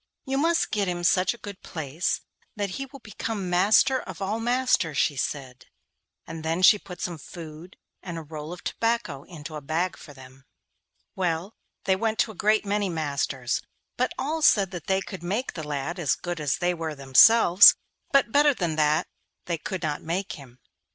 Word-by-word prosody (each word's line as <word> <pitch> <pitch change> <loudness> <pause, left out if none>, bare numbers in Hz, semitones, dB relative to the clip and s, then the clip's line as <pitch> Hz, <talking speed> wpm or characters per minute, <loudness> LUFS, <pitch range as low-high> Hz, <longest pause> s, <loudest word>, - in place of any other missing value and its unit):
'You 270 +1 -1
must 330 +2 +1
get 205 -2 0
him 175 -1 -3
such 185 +4 +3
a - - -16
good 205 -4 -9
place 160 +1 -3 0.3
that 205 -2 -2
he 270 +8 -5
will 275 0 -13
become 210 -4 -4
master 210 +8 +4
of 185 -3 -9
all 200 +3 -2
masters,' 240 - +1
she 150 - +2
said, 130 -2 -4 0.6
and 165 -1 -8
then 165 +3 -1
she 210 +3 +7
put 180 -2 -11
some 175 -3 -4
food 165 +2 -11 0.2
and 175 -3 -6
a 165 - -6
roll 155 +1 -8
of 180 - -9
tobacco 230 -11 -1
into 155 -3 -9
a 150 - -6
bag 160 +6 -1
for 150 - -13
them. 130 -1 -15 0.7
Well, 180 +2 -2 0.3
they 190 - +2
went 220 +2 -1
to 220 - +1
a - - -12
great 215 +2 +2
many 205 -1 0
masters, 140 -6 -2 0.3
but 255 +1 0
all 305 +5 -2
said 200 -10 +4
that 175 -4 -8
they 190 0 +2
could 190 -2 -8
make 205 +9 -2
the 165 - -6
lad 150 +4 -4
as 150 -6 +1
good 175 -2 -5
as 145 -3 0
they 180 0 +1
were 160 -2 -4
themselves, 175 - +7 0.4
but 275 -4 +3
better 290 +1 +4
than 170 -6 -2
that 150 0 +2 0.4
they 170 -2 -2
could 185 +3 -5
not 150 -2 -2
make 180 +4 -3
him. 130 -4 -11
175 Hz, 190 wpm, -26 LUFS, 155-210 Hz, 0.7 s, she